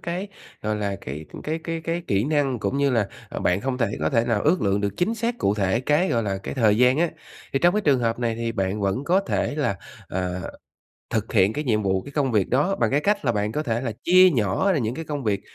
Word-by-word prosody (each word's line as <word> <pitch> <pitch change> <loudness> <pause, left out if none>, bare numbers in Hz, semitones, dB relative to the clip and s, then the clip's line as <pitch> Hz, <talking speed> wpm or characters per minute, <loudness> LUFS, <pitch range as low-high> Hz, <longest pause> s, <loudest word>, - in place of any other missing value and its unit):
cái, 180 +4 -4 0.3
gọi 110 0 -1
là, 100 -2 -2
cái 75 +4 -7 0.2
cái 160 +2 -2
cái 165 0 -4
cái 165 +2 -3
kỹ 100 +3 +1
năng 145 -4 +1
cũng 105 +7 -1
như 140 0 +2
là, 110 -5 +1 0.2
à, - - -4
bạn 90 +2 +1
hông 130 0 -2
thể 115 - +2
có 80 +1 +1
thể 115 0 +2
nào 115 -4 0
ước 160 -2 +2
lượng 100 0 +1
được 100 -1 -2
chính 210 +6 +1
xác 230 +2 -2
cụ 100 - +1
thể 100 +3 +1
cái, 150 +7 +2
gọi 115 -1 +1
là, 95 -2 -2
cái - - -5
thời 110 -5 +3
gian 125 +4 +4
á. 170 -1 +2 0.4
Thì 135 - +2
trong 175 +5 +3
cái 210 - +2
trường 140 -8 +3
hợp 115 0 0
này 115 -2 0
thì 115 0 -3
bạn 100 -1 -1
vẫn 100 +7 -1
có 185 +5 +3
thể 195 - -1
là, 120 -10 0 0.3
à, 90 0 -3 0.7
thực 110 -2 -2
hiện 100 -1 +4
cái 150 +6 -3
nhiệm 110 -5 +1
vụ, 95 -1 +1
cái 140 - -11
công 140 -4 0
việc 105 -4 +2
đó 150 +10 +2
bằng 115 -2 +1
cái 145 - +2
cách 205 -1 0
là 120 - +2
bạn 105 0 -1
có 150 - -1
thể 115 -4 -1
là 115 -4 -3
chia 185 +1 +7
nhỏ 120 - +1
ra 155 - +1
những 115 0 -1
cái 165 - -5
công 145 -4 -4
việc 100 -2 0
120 Hz, 270 wpm, -24 LUFS, 105-155 Hz, 0.7 s, chia